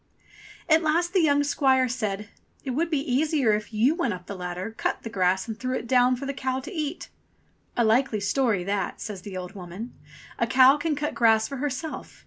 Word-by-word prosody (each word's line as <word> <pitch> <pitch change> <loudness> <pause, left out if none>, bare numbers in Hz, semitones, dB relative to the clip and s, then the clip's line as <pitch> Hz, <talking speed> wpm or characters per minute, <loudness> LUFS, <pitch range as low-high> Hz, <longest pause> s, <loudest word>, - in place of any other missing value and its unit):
At 315 0 +5
last 340 +3 +1
the 375 - +4
young 290 -2 +3
squire 265 -3 +3
said, 210 -4 -3 0.4
"It 265 - -3
would 325 +6 0
be 300 -4 0
easier 275 -3 +1
if 210 +1 -3
you 230 +7 +3
went 295 - -1
up 180 -1 -12
the 200 - -6
ladder, 180 +3 -5
cut - - -2
the 230 - -6
grass, 190 0 +1
and 220 -1 -6
threw 255 0 -2
it - - -6
down 250 0 +4
for 265 +3 -6
the 275 - -3
cow 260 -1 -2
to 315 +9 -8
eat." 310 -1 -4 0.7
*'A 240 - +4
likely 225 0 +2
story 210 -2 +1
that," 195 0 -2
says 205 -4 -6
the 190 0 -7
old 180 +1 -6
woman. 190 +4 -8 0.5
"A - - +2
cow 265 +2 +6
can 300 0 -1
cut 295 +1 -2
grass 220 -2 +3
for 275 - -6
herself. 290 +3 -5
255 Hz, 210 wpm, -26 LUFS, 210-285 Hz, 0.7 s, cow